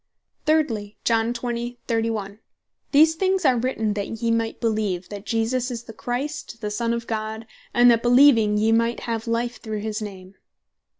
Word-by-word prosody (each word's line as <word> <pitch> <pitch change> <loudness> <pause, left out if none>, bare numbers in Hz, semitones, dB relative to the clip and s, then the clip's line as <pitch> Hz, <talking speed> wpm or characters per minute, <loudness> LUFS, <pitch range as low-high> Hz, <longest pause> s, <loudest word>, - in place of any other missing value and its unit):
Thirdly, 230 -10 +1
John 230 0 +2
20. 240 0 -4
31. 225 -3 -2 0.5
"These 315 +3 +6
things 375 +1 0
are 255 -3 +4
written 225 -4 -1
that 205 -1 -3 0.2
yee 230 - +2
might 230 0 -1
beleeve, 215 -6 -1
that 205 0 -8
Jesus 235 +4 0
is 240 -2 -5
the 225 - -11
Christ, 250 +1 -4
the 210 -1 -4
Son 230 +2 -1
of 235 0 -2
God, 220 0 -4 0.3
and 240 0 +6
that 230 -1 +3
beleeving 240 -4 +5
yee 220 +1 +2
might 230 +1 +1
have 230 -1 -3
life 235 +1 -2
through 215 -2 -4
his 215 0 -3
name." 190 -2 -8
230 Hz, 170 wpm, -23 LUFS, 215-245 Hz, 0.5 s, These